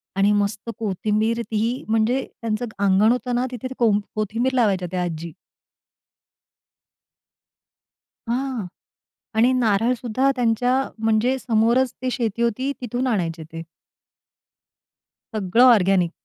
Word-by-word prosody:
आणि 195 +1 +3
मस्त 205 +2 -1
कोथिंबीर 215 +2 0
ती, 230 +3 -2
म्हणजे 225 +4 +1 0.2
त्यांचं 225 +1 -2
अंगण 200 +2 +4
होतं 245 0 -1
ना, 245 +1 +1
तिथे 250 0 -5
ते 260 - -7
कोंब 215 -4 +3
कोथिंबीर 225 +5 -1
लावायच्या 200 -7 +2
त्या 180 -1 -1
आजी. 170 -1 -5 3.0
हां. 250 -2 -2 0.7
आणि 235 +3 +4
नारळसुद्धा 240 +2 +1
त्यांच्या, 245 0 +1 0.2
म्हणजे 225 +4 +1
समोरच 235 +2 +2
ते 255 - -1
शेती 235 -3 -2
होती 245 +4 0
तिथून 245 +2 -2
आणायचे 170 -8 -1
ते. 165 0 -6 1.7
सगळं 215 +2 +2
ऑर्गनिक. 190 -4 +2
225 Hz, 110 wpm, -22 LUFS, 205-245 Hz, 3.0 s, अंगण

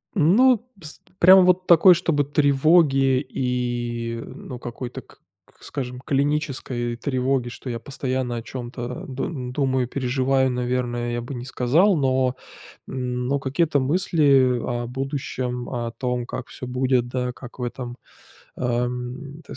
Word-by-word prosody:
Ну, 235 - +4
с 155 -1 -6 0.2
прям 185 +1 +8
вот 185 0 +3
такой 175 +2 +8
чтобы 165 -4 +1
тревоги, 140 -1 +3
и, 120 -2 -2
ну, 125 -2 -9
какой-то 120 +1 -6
к - - -21 0.3
к - - -26
скажем 125 -2 -5
клинической 135 -4 -1
тревоги, 130 -1 -1
что 125 +2 -8
я 115 - -2
постоянно 130 -1 -3
о - - -4
чём-то, 120 0 -6
да, 135 0 -3
думаю, 130 -3 -1
переживаю 130 0 +1
наверное, 125 -1 -1
я 120 0 -2
бы 130 +3 -7
не 120 - -6
сказал, 155 +10 +3
но, 130 -2 +1 0.5
м, 125 -1 -3
но 140 +1 +1
какие-то 145 +3 +1
мысли 140 -4 +3
о 120 -1 -2
будущем, 130 -2 -4
о 120 -2 -3
том 125 0 -2
как 125 - -6
всё 125 - -8
будет, 125 -1 +1
да, 125 0 -2
как 125 0 -12
в - - -3
этом, 120 0 -5 0.6
ам, 125 +4 -3
так - - -9
130 Hz, 140 wpm, -23 LUFS, 125-140 Hz, 0.6 s, прям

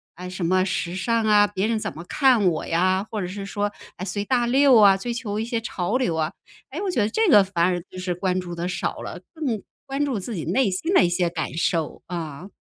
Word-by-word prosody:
哎， 180 +1 -7
什 180 -1 -4
么 185 +2 +3
时 180 -2 -2
尚 230 +4 0
啊， 210 -1 +5
别 200 0 -2
人 225 -1 0
怎 210 -1 -4
么 165 - -8
看 255 -8 +3
我 160 - -3
呀， 185 +4 +1
或 215 -2 -3
者 180 - -3
是 195 +2 -6
说， 205 +1 -2 0.2
哎， 185 - -6
随 200 +2 -2
大 245 0 +2
流 270 +2 +5
啊， 200 -2 +7
追 240 +5 -4
求 215 -3 -3
一 225 - -2
些 230 -1 -1
潮 205 +1 -1
流 245 -11 0
啊。 155 0 -1 0.4
诶， 305 - -5
我 390 - -1
觉 300 - 0
得 205 - +2
这 445 - +1
个 205 -9 +8
反 175 -3 +1
而 180 -1 0
就 185 - -11
是 185 -1 -2
关 185 +1 -1
注 175 -1 -6
的 170 +1 -3
少 180 - -3
了， - - -7
更 265 -10 -2 0.3
关 275 +2 -1
注 255 -7 -2
自 220 +4 -5
己 165 - -4
内 260 -5 +2
心 315 - -1
的 195 - +6
一 - - +1
些 175 0 +1
感 165 -2 -4
受， 165 -2 -1
啊。 170 0 -6
195 Hz, 270 characters per minute, -23 LUFS, 180-230 Hz, 0.4 s, 个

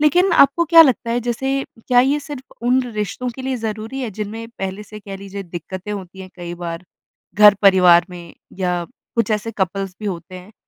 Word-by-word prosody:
लेकिन 350 +5 +3
आपको 280 +3 +5
क्या 330 0 +8
लगता 250 -5 +1
है 240 +1 0
जैसे 265 +3 -1 0.3
क्या 245 -1 +6
ये 275 +4 +2
सिर्फ़ 285 -3 -10
उन 255 +1 +4
रिश्तों 215 +4 -3
के 260 - -8
लिए 260 -1 -2
ज़रूरी 220 +3 -5
है 245 -4 -3
जिनमें 215 +3 -6
पहले 195 +1 -4
से 210 0 -11
कह 200 -1 -8
लीजिए 195 0 -7
दिक्कतें 185 +3 -7
होती 190 -2 -8
हैं, 185 0 -10
कई 175 -1 -6
बार 170 0 -6 0.5
घर 210 -1 +8
परिवार 180 -3 +6
में 175 -2 -10 0.2
या 180 -2 -1 0.3
कुछ 230 -2 0
ऐसे 215 +1 -1
कपल्स 190 0 -2
भी 215 - -5
होते 185 -1 -5
हैं। 185 +4 -15
210 Hz, 195 wpm, -20 LUFS, 185-250 Hz, 0.5 s, क्या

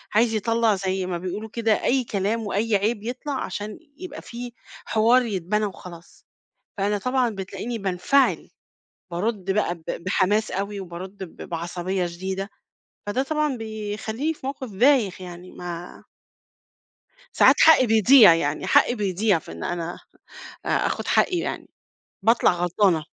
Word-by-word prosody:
عايز 225 +1 +4
يطلّع 225 0 +2
زي 190 0 -2
ما 180 -1 -3
بيقولوا 185 +5 -5
كده 225 -1 0
أي 260 0 +2
كلام 210 +1 -1
وأي 210 +2 0
عيب 210 +2 0
يطلع 255 +5 -4
عشان 205 +5 -6 0.2
يبقى 365 +2 -8
في 240 0 -8 0.3
حوار 230 +4 +4
يتبنى 210 0 -1
وخلاص، 180 -3 -10 0.5
فأنا 205 +1 0
طبعًا 250 +3 +1
بتلاقيني 200 +3 -5
بانفعل، 195 +8 +1 0.6
بأرُدّ 195 +1 -2
بقى 190 -3 0
ب 165 - -20
بحماس 190 +4 0
أوي، 200 +1 -3
وبأَرُدّ 190 +2 -8
ب 170 - -11
بعصبيَّة 175 +2 -2
شديدة، 190 +3 -5 0.6
فده 225 +6 0
طبعًا 300 -1 -1
بيخلّيني 220 +6 -4
في 265 - -10
موقف 265 -3 -5
بايخ 220 -3 +3
يعني 180 0 -9
ما 175 0 -8 1.3
ساعات - - +7
حَقِّي 320 -5 +7
بيضيع، 220 -3 +7
يعني 145 -2 -1
حَقِّي - - +4
بيضيع، 200 -2 +1
في 145 - -11
إن 85 0 -7
أنا 175 0 -4 0.7
آآ - - -3 0.2
آخُد - - -2
حَقِّي 360 -4 +2
يعني، - - -4 0.6
باطلع 230 -3 +5
غلطانة. 175 -1 +1
205 Hz, 135 wpm, -24 LUFS, 185-230 Hz, 1.3 s, ساعات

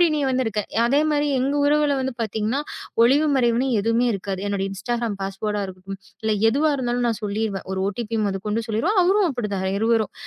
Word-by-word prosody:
இப்டி 345 - +6
நீ 295 - 0
வந்து 260 0 +1
இருக்க." 210 -1 -1 0.2
அதே 280 +4 +3
மாதிரி 295 0 +1
எங்க 275 +3 0
உறவுல 290 -1 +3
வந்து 260 -1 -3
பாத்தீங்கன்னா, 220 +5 -1 0.4
ஒளிவு 280 +6 +4
மறைவுன்னு 240 +1 +2
எதுவுமே 230 +3 +1
இருக்காது. 195 -1 -4
என்னோட 200 -1 -1
Instagram 230 +3 -2
பாஸ்வேர்ட் 205 +2 -3
ஆ - - -2
இருக்கட்டும், 190 +1 -9 0.2
இல்ல 220 0 +1 0.2
எதுவா 300 +5 +2
இருந்தாலும் 245 -2 -1
நான் 225 - -2
சொல்லிருவேன். 205 -1 -2
ஒரு 190 - -2
ஓ. - - +1
ட்டி. 240 - -2
ப்பி. 230 - -3
வும் 210 - +1
அது 195 - -3
கொண்டு 215 +2 0
சொல்லிருவேன். 330 - +1
அவரும் 385 +2 +3
அப்படி 240 -5 -3
தான். 190 - -2
இருவரும். 225 -1 +1
230 Hz, 210 wpm, -23 LUFS, 210-270 Hz, 0.4 s, இப்டி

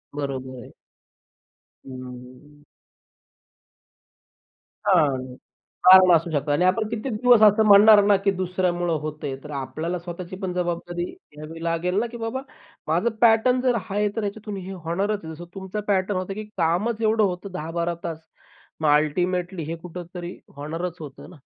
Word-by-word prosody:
बरोबर 130 -3 -5
आहे. - - -15 1.1
हम्म. 130 +3 -11 2.2
हां, 135 -8 +2 0.5
कारणं 185 -1 +9
असू 165 +1 -2
शकतात 145 -1 -2
आणि 155 +5 +2
आपण 190 +4 +2
कित्येक 230 +2 -4
दिवस 245 -3 +6
असं 215 +1 +6
म्हणणार 205 +1 +8
ना, 205 0 +5
की 195 +1 +1
दुसऱ्यामुळं 180 -2 -1
होतं 150 0 -6
आहे. 135 -1 -3
तर 150 - -9
आपल्याला 155 +5 -4
स्वतःची 175 +1 -8
पण 185 -1 -2
जबाबदारी 175 0 -2 0.3
घ्यावी 155 +2 -9
लागेल 170 +3 0
ना 235 - -1
की, - - -6
"बाबा, 230 +3 -3 0.5
माझं 175 +9 +1
पॅटर्न 235 +2 +4
जर 250 -2 +2
हा 195 -2 -5
आहे, 210 0 +2
तर - - 0
ह्याच्यातून 205 0 -5
हे 190 0 -7
होणारच 190 +3 -2
आहे." 160 - -7
जसं 170 +3 -9
तुमचा 190 +2 -5
पॅटर्न 195 0 +1
होता 185 +1 -4
की 215 +2 -6
कामच 190 +7 0
एवढं 220 0 +3
होतं, 185 +1 -3
10-12 170 0 -3
तास. 160 -1 -4 0.6
मग 155 - +1
अल्टिमेटली 175 +4 +1
हे 165 +2 -4
कुठेतरी 175 0 -8 0.2
होणारच 165 +4 -4
होतं 145 -3 -10
ना. 180 - -14
180 Hz, 155 wpm, -24 LUFS, 160-200 Hz, 2.2 s, कारणं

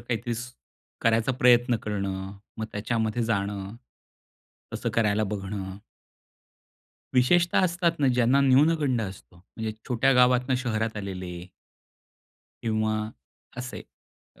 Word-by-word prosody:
काहीतरी 120 0 -3 0.7
करायचा 115 +3 +3
प्रयत्न 120 0 +5
करणं. 100 -3 -4 0.3
मग 110 - -2
त्याच्यामध्ये 110 +2 -1
जाणं. 100 -1 -2 1.0
तसं - - -2
करायला 110 -1 +2
बघणं. 95 -1 -5 1.4
विशेषतः 170 +9 +4
असतात 170 -2 0
ना, 140 - +3
ज्यांना 125 +2 +3
न्यूनगंड 140 -1 +3
असतो. 95 -3 -9
म्हणजे 110 +4 -6 0.2
छोट्या 130 +2 +3
गावातून 125 0 +4
शहरात 110 -3 -2
आलेले 95 -3 -5 1.3
किंवा 110 -1 0 0.6
असे 125 0 -6 0.5
अ, - - -22
115 Hz, 100 wpm, -26 LUFS, 105-125 Hz, 1.4 s, प्रयत्न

